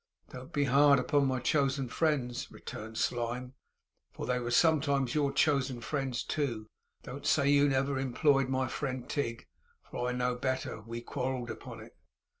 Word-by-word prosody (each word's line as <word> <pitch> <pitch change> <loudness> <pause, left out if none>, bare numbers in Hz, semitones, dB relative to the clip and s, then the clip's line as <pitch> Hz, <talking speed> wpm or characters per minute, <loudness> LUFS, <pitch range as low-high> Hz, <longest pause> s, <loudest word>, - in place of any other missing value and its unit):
'Don't 130 +4 -9
be 145 -3 +1
hard 140 +1 +5
upon 140 +2 +2
my 130 -1 0
chosen 135 -1 +1
friends,' 130 -3 -1
returned 110 +1 -8
Slyme, 125 +1 -2 0.6
'for - - -6
they 125 0 0
were 120 -1 -3
sometimes 140 -3 +3
your 145 -2 +1
chosen 140 -3 +1
friends 135 0 -2
too. 120 -8 -2 0.4
Don't 135 +2 -6
say 140 -2 +3
you 145 0 +5
never 135 0 +1
employed 135 +1 +2
my 130 0 0
friend 130 -2 -4
Tigg, 115 -6 -3 0.4
for 125 - -3
I - - 0
know 125 0 0
better. 130 -3 -3
We 115 +2 -6
quarrelled 125 -1 -3
upon 110 - -9
it. - - -14
130 Hz, 160 wpm, -31 LUFS, 125-140 Hz, 0.6 s, hard